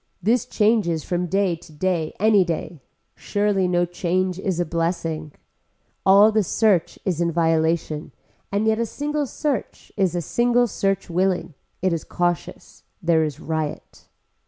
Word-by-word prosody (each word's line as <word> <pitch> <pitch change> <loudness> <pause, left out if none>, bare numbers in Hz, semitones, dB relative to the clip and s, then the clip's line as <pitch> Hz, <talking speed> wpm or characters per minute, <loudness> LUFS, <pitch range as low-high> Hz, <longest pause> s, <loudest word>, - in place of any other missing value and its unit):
This 235 +6 +1
changes 210 -9 +1
from 180 0 -2
day 190 0 +1
to 165 -1 -16
day 165 0 -1
any 210 -1 +5
day. 170 -2 -4 0.3
Surely 205 -2 0
no 175 0 +2
change 180 +1 -1
is 190 -3 -2
a 175 - +1
blessing. 165 -2 -2 0.8
All 200 +3 +7
the 215 0 +3
search 200 -2 +1
is 175 -3 0
in 170 0 +1
violation 160 -1 0 0.4
and 200 +2 0
yet 220 0 +2
a 235 - +1
single 295 +3 -2
search 275 -3 -3
is 190 -4 +1
a 175 - 0
single 245 +6 +2
search 195 -3 -1
willing. 180 -1 0 0.3
It 185 -2 +2
is 165 - -2
cautious. 175 -1 -3 0.2
There 165 -4 +2
is 150 -3 -4
riot. 155 -2 -5
180 Hz, 150 wpm, -23 LUFS, 165-205 Hz, 0.8 s, All